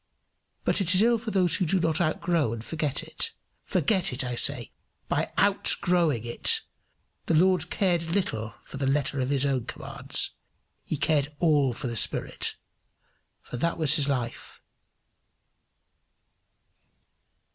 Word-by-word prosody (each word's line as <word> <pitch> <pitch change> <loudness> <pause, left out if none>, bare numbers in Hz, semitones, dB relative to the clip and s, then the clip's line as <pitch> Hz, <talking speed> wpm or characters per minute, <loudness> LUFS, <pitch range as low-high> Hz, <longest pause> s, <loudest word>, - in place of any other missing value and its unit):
But - - +1
it 185 -1 +4
is 190 - +7
ill 235 0 +3
for 225 0 -5
those 185 -4 +2
who 185 - 0
do 190 +4 +2
not 165 0 +1
outgrow 160 -5 0
and 115 0 -7
forget 150 -4 -2
it! 460 - -3 0.3
Forget 195 -6 0
it, 125 - +1
I 125 -1 -3
say, 120 - +2 0.4
by - - -1
outgrowing 165 -10 +2
it. 120 - +2 0.7
The 165 - +2
Lord 180 0 +3
cared 175 -4 +1
little 140 - -2
for - - -10
the 135 -1 -1
letter 140 0 0
of 130 - -2
his 140 -1 +2
own 130 -4 0
commands; 120 - -2 0.5
he 155 - -3
cared 150 -1 +1
all 150 -6 +3
for 125 +4 -7
the 120 -1 -3
spirit, - - -1 0.9
for 125 - -7
that 170 +7 -1
was 150 -2 +2
life. 125 -4 -4
155 Hz, 140 wpm, -26 LUFS, 130-175 Hz, 0.9 s, is